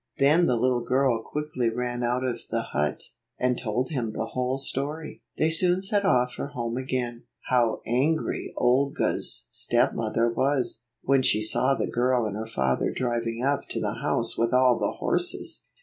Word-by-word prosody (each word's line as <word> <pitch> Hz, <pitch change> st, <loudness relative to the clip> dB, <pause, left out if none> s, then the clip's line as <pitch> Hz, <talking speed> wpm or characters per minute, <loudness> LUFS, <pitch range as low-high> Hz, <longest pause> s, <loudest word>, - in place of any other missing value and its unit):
Then 155 Hz, +5 st, +4 dB
the 125 Hz, -, +2 dB
little 125 Hz, +1 st, +1 dB
girl 125 Hz, -1 st, +1 dB
quickly 150 Hz, -2 st, -2 dB
ran 120 Hz, +1 st, -3 dB
out 125 Hz, +1 st, 0 dB
of 125 Hz, -2 st, -2 dB
the -, -, -1 dB
hut, 75 Hz, +1 st, -1 dB, 0.4 s
and 125 Hz, 0 st, +2 dB
told 125 Hz, +2 st, -2 dB
him 120 Hz, -7 st, -3 dB
the 110 Hz, +1 st, -3 dB
whole 130 Hz, +1 st, -1 dB
story. 145 Hz, +3 st, -3 dB, 0.2 s
They 160 Hz, +1 st, +2 dB
soon 180 Hz, +3 st, +4 dB
set 200 Hz, +1 st, +1 dB
off 125 Hz, -8 st, +3 dB
for -, -, -5 dB
home 120 Hz, -4 st, -4 dB
again. 125 Hz, -2 st, -3 dB, 0.2 s
How 120 Hz, -3 st, +2 dB
angry 140 Hz, +7 st, 0 dB
Olga's 125 Hz, -, +1 dB
stepmother 115 Hz, +1 st, +1 dB
was, 125 Hz, -1 st, 0 dB, 0.2 s
when 135 Hz, 0 st, +3 dB
she 110 Hz, -4 st, +3 dB
saw 130 Hz, +5 st, +2 dB
the -, -, -1 dB
girl 125 Hz, -1 st, +1 dB
and 105 Hz, -2 st, -3 dB
her 110 Hz, +1 st, -5 dB
father 65 Hz, -11 st, 0 dB
driving 120 Hz, -1 st, -2 dB
up 140 Hz, +1 st, 0 dB
to -, -, -2 dB
the -, -, -3 dB
house -, -, +2 dB
with 115 Hz, +2 st, +2 dB
all 125 Hz, -2 st, +4 dB
the -, -, -1 dB
horses -, -, 0 dB
125 Hz, 170 wpm, -26 LUFS, 115-135 Hz, 0.4 s, Then